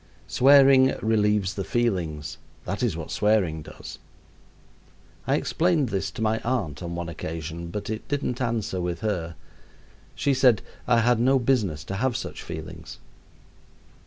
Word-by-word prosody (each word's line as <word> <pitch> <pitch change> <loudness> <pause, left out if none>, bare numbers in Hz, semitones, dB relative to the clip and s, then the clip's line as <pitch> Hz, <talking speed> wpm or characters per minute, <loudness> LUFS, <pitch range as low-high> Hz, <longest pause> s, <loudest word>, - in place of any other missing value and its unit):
Swearing 135 0 +6
relieves 105 -3 +2
the 100 - -3
feelings 90 -9 -2 0.3
that 100 +5 -3
is 110 -10 0
what 80 - -6
swearing 100 -7 +1
does. - - -10 1.3
I - - +3
explained 160 -6 +1
this 95 -2 -2
to 110 - -5
my 110 +1 +1
aunt 105 - -2
on 85 -1 -5
one 85 -1 -4
occasion, 80 0 -6
but 100 +4 -5
it 110 0 -5
didn't 140 -3 -2
answer 115 -6 -1
with 90 +1 -3
her. 90 -6 -2 0.8
She 140 - +1
said 125 -5 +4 0.2
I 120 -2 +4
had 120 0 +3
no 130 +3 +4
business 110 - 0
to 95 - -5
have 125 +2 0
such - - -6
feelings. 80 0 -8
105 Hz, 145 wpm, -25 LUFS, 85-125 Hz, 1.3 s, Swearing